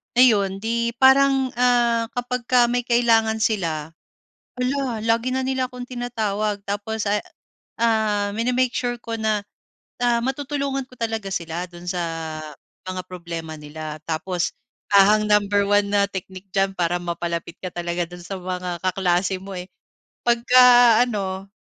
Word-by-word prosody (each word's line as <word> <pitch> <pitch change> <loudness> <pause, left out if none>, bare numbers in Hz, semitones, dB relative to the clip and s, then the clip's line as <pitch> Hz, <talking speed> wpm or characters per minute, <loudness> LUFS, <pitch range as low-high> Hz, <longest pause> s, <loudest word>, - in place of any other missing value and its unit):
Ayun, 200 -6 +4
'di 235 +1 -1
parang, 265 0 +5
ah, 240 -2 +3
'kapagka 245 0 +1
may 245 0 0
kailangan 225 -2 +3
sila, 165 -9 -1 0.7
hala, 250 -3 -1
lagi 230 +3 +1
na 260 - 0
nila 260 -1 -1
akong 250 -1 -8
tinatawag. 215 -5 -2
Tapos, 205 +2 -3
ah, 205 0 +1 0.6
ah, 215 -3 +1
mini-make 245 +3 +1
sure 245 -1 -1
ko 230 -1 -4
na, 215 -2 0 0.5
ah, 240 -1 +2
matutulungan 275 0 -2
ko 255 - -20
talaga 225 -4 -3
sila 170 0 -3
do'n 175 0 -9
sa 180 -1 -2 0.8
mga 185 0 -4
problema 165 -3 -6
nila. 155 +1 -7
Tapos, 170 +2 -2 0.4
ah, 200 +2 +7
ang 215 - -1
number 205 -1 +3
one 205 0 +2
na 200 0 +3
technique 190 0 -8
diyan 195 -1 +1
para 175 0 0
mapalapit 170 -1 -4
ka 185 -2 -7
talaga 175 0 -2
do'n 175 +1 -11
sa 190 +2 -6
mga 180 -1 -4
kaklase 185 0 +1
mo, 195 -1 -7
eh. 180 - -6 0.6
Pagka-ano, 235 -5 +4
210 Hz, 140 wpm, -22 LUFS, 185-245 Hz, 0.8 s, ah